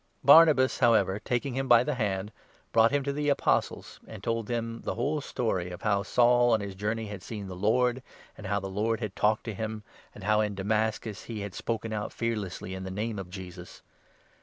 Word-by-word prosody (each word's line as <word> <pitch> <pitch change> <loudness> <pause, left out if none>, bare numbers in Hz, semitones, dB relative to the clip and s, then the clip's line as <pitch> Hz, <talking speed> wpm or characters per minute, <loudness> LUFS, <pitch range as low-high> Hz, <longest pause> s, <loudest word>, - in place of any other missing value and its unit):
Barnabas, 155 -5 +6
however, 110 -5 +3
taking 125 +4 -2
him 135 +1 -2
by 120 -1 +6
the 150 - -1
hand, 105 -4 -2 0.4
brought 115 0 +5
27 145 - +1
him 140 - -3
to 140 +1 -2
the 145 +1 -1
Apostles, 140 - 0
and - - -10
told 115 -2 -1
them 115 -1 -3
the - - -3
whole 150 +1 -1
story 110 -10 -2
of 90 - -9
how 100 -1 +2
Saul 120 +3 +4
on 110 - +3
his 100 -1 -5
journey 105 +3 -2
had 105 -3 -7
seen 105 +1 -7
the 95 - -7
Lord, 120 +6 +1 0.3
and 105 - -8
how 100 +1 0
the 95 - -6
Lord 110 +4 -1
had 110 -5 -5
talked 105 +1 +1
to 110 - -5
him, 110 +1 -5 0.3
and - - -11
how 105 +2 +3
in 105 -2 -1
Damascus 105 0 -2
he 110 -3 -5
had 100 -2 -6
spoken 115 -1 -3
out 105 -1 -3
fear 115 0 -1
lessly 95 -2 -6
in 95 - -6
the 95 - -5
Name 105 +2 -3
of 95 -2 -7
Jesus. 90 -1 -10
110 Hz, 215 wpm, -28 LUFS, 100-120 Hz, 0.4 s, Barnabas